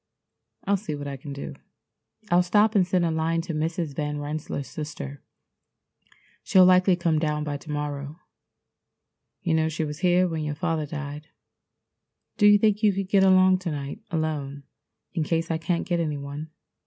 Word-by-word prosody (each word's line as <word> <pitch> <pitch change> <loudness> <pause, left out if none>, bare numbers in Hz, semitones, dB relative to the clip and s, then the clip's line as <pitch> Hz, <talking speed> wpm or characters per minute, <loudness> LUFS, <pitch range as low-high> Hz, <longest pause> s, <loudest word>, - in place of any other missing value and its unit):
I'll 200 0 +2
see 190 -6 -5
what 145 0 -6
I 140 - -4
can 140 +2 -9
do. 140 0 -6 0.8
I'll 175 +1 +6
stop 205 +4 +3
and 190 -5 +3
send 180 -1 +2
a 165 - +1
line 160 +1 0
to 170 0 -5
Mrs. 160 -1 -2
Van 150 0 -2
Rensselaer's 145 -1 -4
sister. 145 -2 -7 1.2
She'll 185 -1 +5
likely 185 0 +5
come 170 -3 +1
down 150 -1 -1
by 145 -1 -3
to 150 - -15
morrow. 145 0 -4 1.3
You 170 - +1
know 160 0 +2
she 160 0 -2
was 150 0 -6
here 180 0 +3
when 160 -2 -3
your 150 -1 -3
father 160 -2 -1
died. 150 0 -6 1.1
Do 205 - +5
you 205 0 +8
think 210 0 +2
you 210 -2 +4
could 195 0 -3
get 195 -1 +4
along 185 -1 +5
to 180 -2 -4
night 145 +5 -5
alone 150 -4 -3 0.5
in 165 -4 0
case 165 +2 -1
I 160 - -1
can't 170 +1 -1
get 175 -2 0
any 155 -3 -1
one? 140 +2 -7
160 Hz, 180 wpm, -25 LUFS, 150-180 Hz, 1.3 s, you